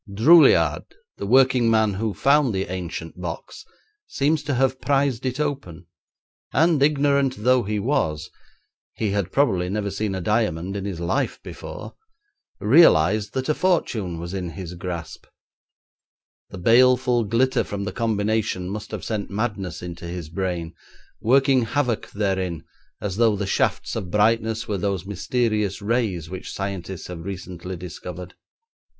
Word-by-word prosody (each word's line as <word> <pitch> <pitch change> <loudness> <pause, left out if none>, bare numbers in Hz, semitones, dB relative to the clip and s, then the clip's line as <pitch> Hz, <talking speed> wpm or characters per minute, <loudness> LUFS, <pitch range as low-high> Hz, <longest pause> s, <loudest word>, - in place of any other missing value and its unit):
Droulliard, 110 - +5 0.3
the 100 - -5
working 130 0 +4
man 110 -2 +3
who 105 +1 -2
found 140 -5 +3
the 95 -1 -2
ancient 90 -2 -6
box, 85 -2 -6 0.4
seems 150 +2 +1
to 145 -2 -2
have 130 +1 +1
prised 135 -2 +1
it 130 +3 -3
open, 135 - -3 0.7
and 160 -1 +3
ignorant 140 -2 +2
though 125 +1 +4
he 105 0 -2
was 80 - -1 0.6
he 110 -3 -1
had 100 -3 -1
probably 95 -11 +2
never 100 0 -2
seen 100 0 -2
a - - -2
diamond 95 -2 -1
in 100 -1 -4
his 95 -4 -4
life 85 0 -1
before - - -8 0.7
realised 105 - +4
that 130 0 -1
a 155 - +3
fortune 115 - 0
was 85 +2 -6
in 90 -3 -3
his 90 0 -7
grasp. 90 -1 -6 1.2
The - - -9
baleful 125 +4 +4
glitter 120 +5 +1
from 100 -1 -5
the - - -3
combination 110 -4 -1
must 105 +1 -6
have 105 -6 -6
sent 105 -3 -3
madness 100 -6 -3
into 85 -1 -7
his 85 -2 -6
brain, 90 -2 -3 0.5
working 135 +2 +4
havoc 125 -2 -1
therein 95 -5 -2 0.3
as 100 -2 -4
though 115 -2 +4
the 100 0 -2
shafts 95 - 0
of 90 - -4
brightness 110 +3 +1
were 105 -3 -2
those 95 -2 -2
mysterious 105 0 -1
rays 105 -7 -1
which 95 +2 -7
scientists 95 -2 -5
have 85 -2 -7
recently 90 -1 -6
discovered. 90 0 -8
105 Hz, 145 wpm, -23 LUFS, 90-125 Hz, 1.2 s, Droulliard